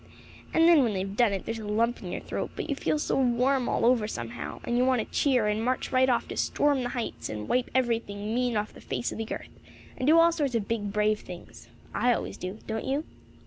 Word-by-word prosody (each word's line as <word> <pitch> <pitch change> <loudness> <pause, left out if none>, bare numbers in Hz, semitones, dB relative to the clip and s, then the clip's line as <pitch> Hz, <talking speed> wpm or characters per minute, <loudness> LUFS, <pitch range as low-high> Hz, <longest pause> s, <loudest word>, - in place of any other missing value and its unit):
And 325 0 +5
then, 335 -4 +7
when 235 -5 +1
they've 195 +1 -3
done 235 -2 +4
it, 195 -2 -3
there's 225 0 -3
a 215 - -7
lump 230 +3 +1
in 180 - -6
your - - -4
throat; - - -4
but - - -4
you 285 - -1
feel 305 - 0
so 300 - 0
warm 255 +1 +2
all - - +1
over 235 -3 +3
somehow, 120 - -6
and 240 - -1
you 245 - +3
want 260 0 +3
to 220 - -5
cheer, 255 -6 +3
and 210 +1 0
march 255 +2 -1
right 260 0 +4
off 240 - +1
to - - -5
'storm 285 -2 +2
the 245 - -2
heights,' 240 -3 -4
and 105 -1 -5
wipe 250 0 +1
every 240 -3 +3
thing 205 0 -6
mean 245 -2 +1
off 210 0 -2
the - - -13
face - - -3
of - - -6
the 225 - -4
earth, - - -7 0.4
and 255 - -2
do 320 +2 +7
all 335 0 +6
sorts 285 -7 -1
of 210 -3 -1
big, 210 -3 -2
brave 210 +1 +2
things. 180 -1 -11 0.2
I 245 0 +3
always - - -5
do. 185 +3 -5
Don't 220 0 -3
you?" 275 +3 0
235 Hz, 255 wpm, -28 LUFS, 210-260 Hz, 0.4 s, then